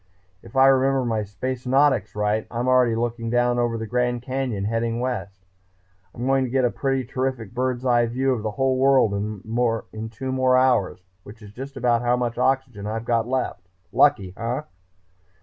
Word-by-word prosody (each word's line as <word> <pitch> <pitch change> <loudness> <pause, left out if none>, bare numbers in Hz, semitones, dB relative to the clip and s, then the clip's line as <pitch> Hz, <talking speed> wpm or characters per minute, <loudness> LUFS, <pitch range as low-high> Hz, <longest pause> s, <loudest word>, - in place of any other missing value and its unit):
If 115 +1 -15
I 135 0 +6
remember 135 -1 +3
my 110 -2 0
Spacenautics 125 +2 0
right 105 +1 0
I'm 120 +1 -3
already 125 -3 +4
looking 115 0 -2
down 120 0 +2
over 120 -1 0
the 110 - -4
Grand 125 +1 -1
Canyon, 130 -6 -2
heading 115 +1 -1
west. 105 -7 -4 0.7
I'm 120 - -4
going 135 0 +2
to 130 - -3
get 130 0 +2
a 120 - +1
pretty 135 -1 -1
terrific 130 -3 -3
bird's 130 0 -2
eye 120 -2 +3
view 130 +3 0
of 120 - -3
the 110 - -2
whole 135 -1 +1
world 135 -5 +4
in 110 +2 -3
two 130 +4 -5
more 130 -1 +3
hours, 125 -8 +2 0.2
which 110 +4 -13
is 105 -1 -12
just 135 +4 -8
about 120 -2 +2
how 120 0 +2
much 120 -1 -2
oxygen 130 -6 0
I've 110 +2 -4
got 115 -1 +1
left.... 125 -8 -3 0.3
Lucky, 100 -11 +3
eh?" 120 +5 -2
120 Hz, 180 wpm, -23 LUFS, 110-130 Hz, 0.7 s, I